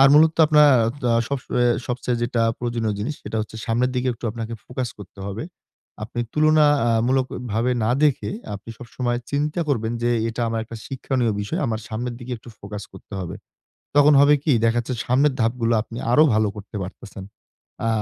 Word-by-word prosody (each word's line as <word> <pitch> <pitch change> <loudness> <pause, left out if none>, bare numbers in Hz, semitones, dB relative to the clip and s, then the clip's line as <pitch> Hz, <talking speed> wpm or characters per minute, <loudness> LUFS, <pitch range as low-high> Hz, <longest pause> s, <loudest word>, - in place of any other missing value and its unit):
আর 135 - +8
মূলত 155 +1 +6
আপনার 150 -1 +6 0.2
আ - - +1
ত - - -7 0.2
সবস 140 -2 -3 0.2
এ - - +4 0.2
সবচেয়ে 125 0 -1
যেইটা 120 -1 0 0.2
প্রয়োজনীয় 115 -3 -1
জিনিস 115 +9 -3
সেইটা 110 - -3
হচ্ছে 110 - -9
সামনের 120 +2 +1
দিকে 125 +1 0
একটু 115 - -12
আপনাকে 115 +1 -5
ফোকাস 125 0 -3
করতে 100 0 -12
হবে। 100 +3 -4 0.6
আপনি 120 +2 -5
তুলনা 155 0 +4 0.2
আ - - +3 0.2
মূলক 130 0 +2 0.3
ভাবে 115 +4 +1
না 110 - +2
দেখে 145 -2 +1 0.2
আপনি 100 +3 -9
সবসময়ে 120 0 -3
চিন্তা 150 +4 -1
করবেন 115 -5 0
যে, 120 - +2 0.2
"এইটা 115 +1 -3
আমার 115 0 -1
একটা 115 +1 -9
শিক্ষণীয় 130 -3 -1
বিষয়। 100 - -3
আমার 110 -1 -2
সামনের 120 +2 -3
দিকে 125 0 -7
একটু 115 - -15
ফোকাস 105 +1 -7
করতে - - -11
হবে।" 85 -3 -5 0.6
তখন 145 +1 +7
হবে 145 +1 +6
কি? 155 - +3
দেখা 115 +1 +3
যাচ্ছে 125 +2 -4
সামনের 135 +4 +3
ধাপগুলো 115 0 +1
আপনি 115 +1 -9
আরো 155 +5 +7
ভালো 110 0 +3
করতে 105 0 -8
পারতেছেন। 95 +1 -9 0.6
আ - - +2
120 Hz, 190 wpm, -23 LUFS, 110-135 Hz, 0.6 s, আর